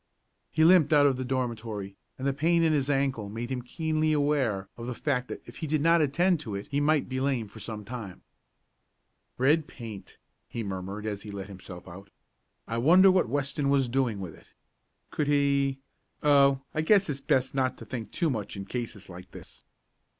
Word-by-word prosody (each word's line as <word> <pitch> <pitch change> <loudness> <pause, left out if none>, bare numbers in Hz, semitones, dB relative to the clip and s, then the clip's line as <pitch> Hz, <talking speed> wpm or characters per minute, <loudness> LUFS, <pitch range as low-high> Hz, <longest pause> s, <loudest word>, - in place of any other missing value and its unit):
He 160 - +2
limped 165 -3 +6
out 145 -2 +6
of 135 -3 +3
the 130 - -3
dormitory, 115 -6 -3 0.2
and 130 - -5
the 140 - +1
pain 165 +4 +2
in 160 -1 +3
his 140 -2 0
ankle 135 -7 0
made 115 +4 -5
him 130 -1 -2
keenly 155 +4 0
aware 140 -10 +1
of 120 0 -7
the 125 - -4
fact 125 -1 -1
that - - -7
if - - -12
he 160 - -4
did 155 +1 +1
not 165 +2 +4
attend 170 +4 +2
to 110 -9 -5
it 100 - -5
he 140 +1 +1
might 150 -1 +2
be 130 0 -3
lame 130 -5 0
for 110 +2 -13
some 105 0 -6
time. 110 -6 -8 1.1
"Red 150 +5 +3
paint," 110 -5 -10 0.3
he 115 - -5
murmured 100 +1 -5
as 105 -2 -3
he 105 - -9
let 100 -1 -6
himself 90 -2 -10
out. 95 +2 -11 0.6
"I 115 - -2
wonder 180 +9 +7
what 185 -10 +2
Weston 140 +1 -1
was 140 -2 +3
doing 120 -4 0
with 90 -4 -7
it? - - -21 0.6
Could 150 - -1
he 140 -2 +2 0.5
Oh, 140 -2 +5
I 155 - 0
guess 195 +4 +4
it's 140 -3 -4
best 130 -2 +1
not 130 -1 0
to - - -10
think 115 -4 -6
too 165 -4 0
much 105 -4 -4
in 95 - -5
cases 110 -5 -5
like 90 0 -11
this." - - -13
130 Hz, 200 wpm, -28 LUFS, 110-145 Hz, 1.1 s, wonder